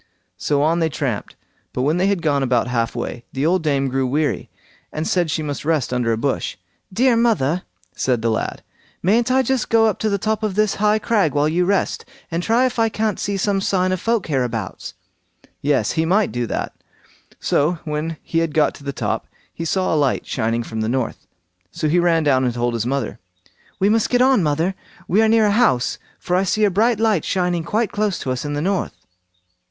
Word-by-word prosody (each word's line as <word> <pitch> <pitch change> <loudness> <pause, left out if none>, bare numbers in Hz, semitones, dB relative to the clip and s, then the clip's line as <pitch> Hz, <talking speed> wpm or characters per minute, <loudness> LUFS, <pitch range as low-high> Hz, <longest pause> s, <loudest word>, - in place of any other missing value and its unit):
So 145 -1 +1
on 165 +3 +2
they 165 -1 +1
tramped; 130 -8 -3 0.4
but 125 - -1
when 150 +5 +2
they 185 +2 +2
had 200 -4 0
got 145 -3 +2
about 125 -3 +2
half 120 -2 -1
way, 120 0 -4
the 135 +2 -1
old 180 +2 +2
dame 140 -3 +1
grew 130 0 0
weary, 145 +3 -1 0.4
and 155 +1 -3
said 175 -3 +1
she 155 +1 -1
must 145 -2 -4
rest 150 -5 0
under 120 -2 +1
a 110 - 0
bush. 135 +4 -2 0.3
"Dear 245 +5 +3
mother", 185 - +2 0.3
said 125 -3 0
the 115 - +2
lad, 110 - -3 0.4
"mayn't 225 +6 +3
I 260 +1 +4
just 265 -3 -1
go 225 -1 +4
up 215 -4 0
to 220 - 0
the 200 - +1
top 215 +2 -1
of 210 -3 -2
this 215 -1 +2
high 210 0 +4
crag 205 -9 +1
while 145 +1 +3
you 175 +3 +1
rest, 200 +1 0 0.3
and 165 +1 -1
try 230 +7 +2
if 250 -2 -2
I 225 0 +3
can't 215 -1 -1
see 200 -1 -1
some 195 0 0
sign 185 -1 +1
of 185 -1 -2
folk 230 -2 0
hereabouts?" 125 -6 -3 0.7
Yes! 145 0 +1
he 160 - 0
might 195 +5 +2
do 120 -1 -2
that; - - -3 0.7
so 150 +5 +1
when 155 +1 -3
he 165 - -1
had 165 -3 -1
got 155 - +3
to - - -14
the 140 - -3
top, - - -3 0.3
he 165 - -5
saw 185 +2 0
a - - +2
light 145 -4 +1
shining 115 0 -1
from 110 -1 -5
the 110 - -1
north. 130 -1 -2 0.4
So 155 - -2
he 170 +4 +3
ran 170 -2 +3
down 130 -3 +3
and 125 -2 0
told 120 0 0
his 115 0 -2
mother. 125 -4 -2 0.6
"We 195 - +2
must 220 +1 +2
get 245 - +2
on, 260 -5 +4
mother; 160 +4 +1 0.3
we 205 +5 +3
are 220 - +4
near 225 -1 +4
a 205 - +3
house, 200 - +2 0.2
for 180 - -2
I 185 - +3
see 215 +3 +1
a 205 - +4
bright 220 +4 +2
light 220 -7 +2
shining 180 -3 0
quite 215 +6 0
close 205 -2 0
to 130 - -2
us 130 - -3
in 145 0 -3
the 145 - -2
north." 195 +1 -1
165 Hz, 220 wpm, -20 LUFS, 135-205 Hz, 0.7 s, I